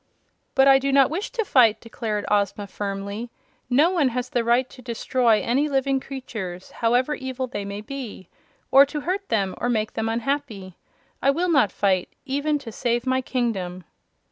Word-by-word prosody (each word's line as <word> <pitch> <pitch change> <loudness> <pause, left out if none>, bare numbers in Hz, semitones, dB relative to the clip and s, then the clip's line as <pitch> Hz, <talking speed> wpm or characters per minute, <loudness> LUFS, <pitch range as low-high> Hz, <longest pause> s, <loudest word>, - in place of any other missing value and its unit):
"But 270 0 +5
I 270 -1 +7
do 275 +1 -1
not 275 0 +5
wish 385 +9 -3
to 470 -3 -2
fight," 235 - +4
declared 220 -3 -4
Ozma, 205 0 +1
firmly. 200 +3 -5 0.4
"No 290 +8 +4
one 335 -7 +2
has 250 0 -3
the 240 - +1
right 240 +2 +2
to 255 - -14
destroy 235 -1 +1
any 275 +6 +1
living 270 -1 +1
creatures, 220 -10 -7
however 245 +5 +1
evil 260 -2 -4
they 235 -5 -5
may 200 +1 -5
be, 225 -6 -7 0.4
or 270 +1 +9
to 290 +1 -3
hurt 385 +5 -3
them 195 -4 0
or 245 - 0
make 220 -2 0
them 225 0 -2
unhappy. 230 -6 -3 0.5
I 275 - +3
will 340 +5 +1
not 265 - +4
fight, 190 -3 +1 0.2
even 285 +2 0
to 260 -5 -9
save 240 +2 -1
my 260 0 +1
kingdom." 195 -9 -2
245 Hz, 175 wpm, -24 LUFS, 215-275 Hz, 0.5 s, or